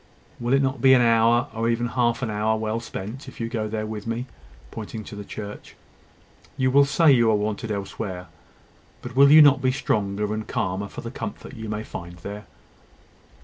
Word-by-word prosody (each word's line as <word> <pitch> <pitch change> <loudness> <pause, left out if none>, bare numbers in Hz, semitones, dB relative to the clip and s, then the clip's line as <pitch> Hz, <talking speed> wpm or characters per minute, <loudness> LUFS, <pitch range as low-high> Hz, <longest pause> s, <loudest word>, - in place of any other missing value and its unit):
Will 120 +2 0
it 135 - +3
not 135 -2 -1
be 130 +1 +7
an 125 - +4
hour, 115 +1 +4
or 115 +1 -1
even 120 +1 0
half 125 0 0
an 110 - -2
hour, 110 +1 0
well 110 +1 -2
spent, 115 +3 -7
if 130 - -11
you 115 - -2
go 110 -2 -3 0.2
with 110 0 -6
me 115 +1 -2
there?" 125 - -19 0.4
pointing 110 0 -7
to 105 - -10
the 105 - -7
church. 105 0 -9 0.8
"You 130 -1 +2
will 140 +1 +6
say 150 +2 +4
you 120 -4 +4
are 110 - +4
wanted 105 +1 -2
elsewhere; 95 -2 -5 0.8
but 125 0 -8
will 140 +1 +7
you 155 0 +10
not 140 -2 +5
be 130 0 +2
stronger 105 -5 -1
and 110 0 -4
calmer 100 -4 -2
for - - -9
the - - -7
comfort - - -7
you 110 -1 -7
may 105 0 -3
find 85 -4 -8
there?" 100 +3 -8
115 Hz, 200 wpm, -24 LUFS, 105-125 Hz, 0.8 s, you